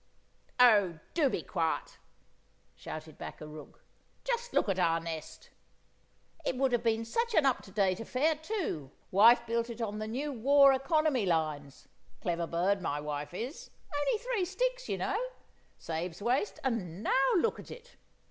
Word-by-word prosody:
"Oh, 205 -9 +6 0.2
do 305 -5 +3
be - - -3
quiet!" 165 -4 -2 0.7
shouted 155 0 -9
back - - -7
a 155 - -8
rook. 150 -1 -12 0.4
"Just 485 -1 -2
look - - +2
at 190 -2 0
our 165 -2 +3
nest! 165 -1 -7 0.9
It 260 - -1
would 265 0 +2
have 240 -2 +2
been 225 -1 +1
such 465 - -1
an 310 - +5
up 265 -2 +2
to 195 - -14
date 190 -2 +1
affair, 260 +7 +1
too; 315 - -4 0.2
wife 230 +5 +6
built 230 0 -1
it 235 0 -7
on 210 -2 -3
the 215 - -3
new 275 +6 -3
war 275 +3 +6
economy 270 - +1
lines—clever 160 +2 -3
bird 185 +4 +1
my 145 -4 -2
wife 145 0 -4
is—only 285 - -4
three 485 -3 -1
sticks, - - -2
you - - -1
know; - - -1 0.5
saves 165 +1 -4
waste; 245 - 0
and 205 -8 -2
now 265 +4 +3
look 395 +5 +1
at - - -11
it! - - -12
230 Hz, 155 wpm, -31 LUFS, -, 0.9 s, Oh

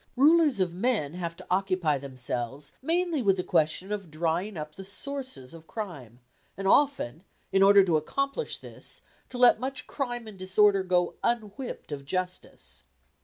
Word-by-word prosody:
Rulers 300 -2 +5
of 180 -2 +1
men 185 - 0
have 170 -2 -4
to 185 - -12
occupy 185 -6 +1
themselves 130 0 -4
mainly 335 +1 0
with 195 -4 +3
the 180 - -1
question 170 +4 +1
of 200 -5 -4
drying 170 +5 -1
up 150 0 -6
the 195 - -9
sources 255 - -5
of 165 -1 -13
crime, 140 - -7 0.4
and 195 0 -2
often, 195 - +2 0.3
in 195 - +3
order 200 0 +8
to 170 -4 +3
accomplish 275 - -2
this, - - -6 0.3
to 250 - -7
let 245 -2 +6
much 260 +2 -4
crime 240 -4 -3
and 210 -3 -11
disorder 195 +1 +4
go 180 -1 +1
unwhipped 235 - -3
of 140 -1 -5
justice. 180 - -5
190 Hz, 160 wpm, -28 LUFS, 160-240 Hz, 0.4 s, order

